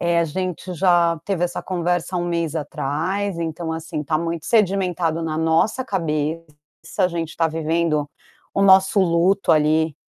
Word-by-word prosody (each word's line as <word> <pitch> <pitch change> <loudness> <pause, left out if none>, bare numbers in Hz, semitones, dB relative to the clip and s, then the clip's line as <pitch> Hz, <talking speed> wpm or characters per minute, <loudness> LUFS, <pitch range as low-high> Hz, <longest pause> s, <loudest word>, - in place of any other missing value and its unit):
Eh, 170 0 +1
a - - +2
gente 180 +2 -4
já 175 -2 +3
teve 190 -3 -1
essa 175 - -4
conversa 175 0 -1
há - - 0
1 175 - -2
mês 170 -2 -1
atrás, 165 +6 -2
então, 165 0 -3
assim, 160 -1 -4
tá 155 +2 0
muito 165 0 -3
sedimentado 180 -6 +1
na 160 -1 -2
nossa 165 +10 +1
cabeça, 160 - -2 0.5
a 185 -2 +4
gente 165 -2 -5
tá 165 - +2
vivendo 160 -1 0 0.5
o 195 - +1
nosso 190 +1 +5
luto 185 +2 +2
ali, 155 0 +2
170 Hz, 160 wpm, -21 LUFS, 160-185 Hz, 0.5 s, nosso